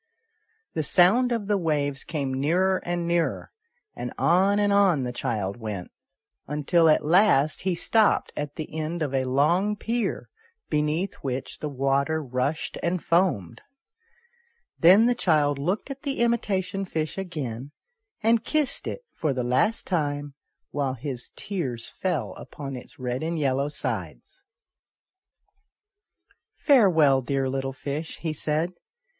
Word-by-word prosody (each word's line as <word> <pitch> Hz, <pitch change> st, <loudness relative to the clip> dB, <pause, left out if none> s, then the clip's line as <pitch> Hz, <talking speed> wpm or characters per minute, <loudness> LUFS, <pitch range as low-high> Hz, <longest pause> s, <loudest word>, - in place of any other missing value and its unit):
The 160 Hz, -, 0 dB
sound 190 Hz, -, +4 dB
of 230 Hz, -4 st, -1 dB
the 205 Hz, -1 st, +1 dB
waves 145 Hz, -4 st, -1 dB
came 140 Hz, -4 st, -3 dB
nearer 175 Hz, +8 st, +2 dB
and 175 Hz, -1 st, -2 dB
nearer, 170 Hz, -1 st, 0 dB, 0.4 s
and -, -, -5 dB
on 190 Hz, +4 st, +3 dB
and 205 Hz, -1 st, +2 dB
on 190 Hz, -9 st, +4 dB
the 125 Hz, -, -2 dB
child 110 Hz, -5 st, -2 dB
went, 105 Hz, -6 st, -6 dB, 0.6 s
until 155 Hz, +3 st, +3 dB
at 155 Hz, -, +3 dB
last 155 Hz, -4 st, +4 dB
he 185 Hz, -1 st, 0 dB
stopped 220 Hz, +4 st, +2 dB
at 145 Hz, 0 st, -4 dB
the 155 Hz, -1 st, -6 dB
end 160 Hz, +1 st, -2 dB
of 140 Hz, -3 st, -3 dB
a 130 Hz, -1 st, +1 dB
long 170 Hz, +11 st, +2 dB
pier, 230 Hz, -1 st, -2 dB, 0.4 s
beneath 150 Hz, +5 st, 0 dB
which 130 Hz, -1 st, -4 dB
the 150 Hz, -, -3 dB
water 140 Hz, +3 st, +1 dB
rushed 135 Hz, +2 st, -2 dB
and 175 Hz, 0 st, -1 dB
foamed. 165 Hz, -, +1 dB, 1.2 s
Then 190 Hz, +7 st, +7 dB
the 245 Hz, -, +4 dB
child 150 Hz, -, +2 dB
looked 185 Hz, -, -2 dB
at 275 Hz, 0 st, -7 dB
the 275 Hz, -4 st, -2 dB
imitation 200 Hz, -5 st, 0 dB
fish 160 Hz, -4 st, -3 dB
again, 140 Hz, -9 st, -5 dB, 0.5 s
and 225 Hz, 0 st, +3 dB
kissed 305 Hz, -4 st, 0 dB
it -, -, -5 dB
for 150 Hz, -4 st, -1 dB
the 125 Hz, -1 st, -2 dB
last 130 Hz, -, +1 dB
time, 145 Hz, -5 st, -2 dB, 0.4 s
while 140 Hz, -3 st, -1 dB
his 130 Hz, -1 st, -5 dB
tears 135 Hz, -, -4 dB
fell 180 Hz, -5 st, -1 dB
upon 135 Hz, -2 st, -7 dB
its 120 Hz, -1 st, -11 dB
red 125 Hz, 0 st, -3 dB
and 165 Hz, +1 st, -2 dB
yellow 140 Hz, -1 st, +1 dB
sides. 150 Hz, -, -4 dB, 1.1 s
" 415 Hz, 0 st, -44 dB
Farewell, 165 Hz, -, +5 dB
dear 135 Hz, +1 st, -1 dB
little 135 Hz, 0 st, -2 dB
fish," 145 Hz, +4 st, -5 dB
he 160 Hz, -2 st, -3 dB
said. 155 Hz, +3 st, -1 dB
155 Hz, 140 wpm, -25 LUFS, 135-190 Hz, 1.2 s, Then